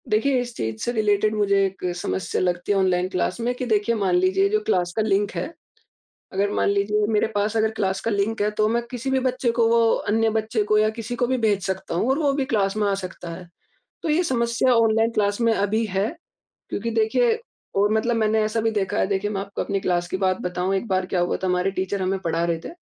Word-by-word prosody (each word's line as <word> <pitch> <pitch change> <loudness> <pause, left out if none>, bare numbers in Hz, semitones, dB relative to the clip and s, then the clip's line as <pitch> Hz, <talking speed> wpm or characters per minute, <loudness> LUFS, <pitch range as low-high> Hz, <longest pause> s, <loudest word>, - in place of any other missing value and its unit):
देखिए, 250 +5 +2
इस 240 -1 -7
चीज़ 110 0 -3
से 240 - 0
रिलेटेड 215 -1 +1
मुझे 200 -1 +2
एक 195 0 -6
समस्या 95 - -2
लगती 180 +2 -1
है 200 - +3
ऑनलाइन 185 -1 +2
क्लास 185 +2 -1
में 245 +2 0
कि 250 - -4
देखिए, 220 0 +1
मान 195 -4 +1
लीजिए 190 +2 +3
जो 215 +1 +2
क्लास 180 -4 +1
का 220 - +1
लिंक 205 -1 +1
है, 335 - -4 0.8
अगर 200 +1 0
मान - - +1
लीजिए 205 +1 +1
मेरे 210 - +3
पास 205 +2 0
अगर 220 0 +2
क्लास 190 -1 0
का 230 - -2
लिंक 205 +1 -1
है, 210 - +1
तो 215 0 +1
मैं 235 +2 0
किसी 255 +1 -4
भी 265 0 +2
बच्चे 255 -1 0
को 230 -1 +2
वो, 230 0 +4
अन्य 225 +1 +1
बच्चे 220 0 0
को 215 +1 +2
या 215 0 +3
किसी 230 +2 -4
को 245 - +1
भी 260 +1 0
भेज 210 -4 +1
सकता 190 -3 -3
हूँ 180 +8 0
और 270 - +2
वो 290 -3 +2
भी 275 -1 0
क्लास 205 -5 0
में 210 -1 +1
आ 200 - +1
सकता 185 -2 -7
है। 175 0 -11 0.5
तो - - -2
ये 315 +4 +3
समस्या 235 -2 +2
ऑनलाइन 225 0 +3
क्लास 205 0 0
में 230 -1 +3
अभी 215 +2 0
है, 195 +1 0 0.6
क्योंकि 230 - -2
देखिए 230 - +2 0.4
और 205 +1 +3
मतलब 230 +2 +1
मैंने 220 0 +2
ऐसा 215 +1 -1
भी 225 0 +1
देखा 200 -3 -1
है, - - +2
देखिए, 200 +1 -1
मैं 200 -2 -2
आपको 200 0 -4
अपनी 195 -1 -2
क्लास 175 -1 0
की 185 - -2
बात 185 -1 +1
बताऊँ। 180 +1 -1
एक 195 - -3
बार 185 -1 0
क्या 180 - -1
हुआ 175 - 0
था, - - +1
हमारे 180 +1 +1
टीचर 190 +1 -2
हमें 190 +1 0
पढ़ा 165 -1 -1
रहे 170 -1 0
थे। - - -5
210 Hz, 245 wpm, -23 LUFS, 190-225 Hz, 0.8 s, वो